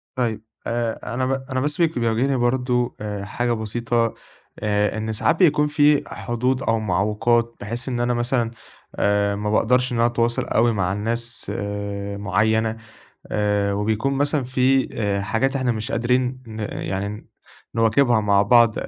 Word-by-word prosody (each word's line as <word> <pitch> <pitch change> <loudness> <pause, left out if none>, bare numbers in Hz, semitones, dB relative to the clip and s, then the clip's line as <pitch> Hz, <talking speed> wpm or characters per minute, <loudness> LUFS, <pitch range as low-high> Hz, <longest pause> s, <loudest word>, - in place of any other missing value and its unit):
طيّب، 115 -4 -1 0.3
آآ 115 -1 -2
أنا 130 +2 0
ب 130 - -1 0.2
أنا 130 0 -1
بس 145 +2 -1
بيك 165 -7 +2
بيواجهني 120 +4 +1
برضه 125 0 0
آآ 105 -2 -4
حاجة 120 +3 -1
بسيطة 115 +1 -1 0.5
آآ، 105 0 0
إن 110 0 -2
ساعات 135 +9 +2
بيكون 150 -4 +4
في 145 0 +3
حدود 120 +5 -1
أو 115 0 +1
معوِّقات 110 +4 +1
بحيث 115 +5 -4
إن 120 -2 -2
أنا 120 0 +1
مثلًا 120 -1 0 0.4
آآ 100 0 +1
ما 105 +1 -3
باقدَرش 125 +4 +2
إن 120 - -1
أنا 115 - +4
أتواصَل 120 0 0
أوي 115 +1 +2
مع 95 -2 0
الناس 115 +4 -2
آآ 100 0 -4
معيّنة، 110 +3 +1 0.5
آآ 105 -1 0
وبيكون 110 +6 0
مثلًا 145 0 0
في 130 +1 +2
آآ 100 -2 -1
حاجات 120 +7 0
إحنا 130 -3 +1
مش 110 0 -4
قادرين 125 +2 0
ن 110 -1 -8
يعني 100 -1 -3
ن 105 +1 -8 0.5
نواكبها 115 +1 +3
مع 100 -1 +3
بعض، 115 +1 +5
115 Hz, 160 wpm, -22 LUFS, 105-125 Hz, 0.5 s, بعض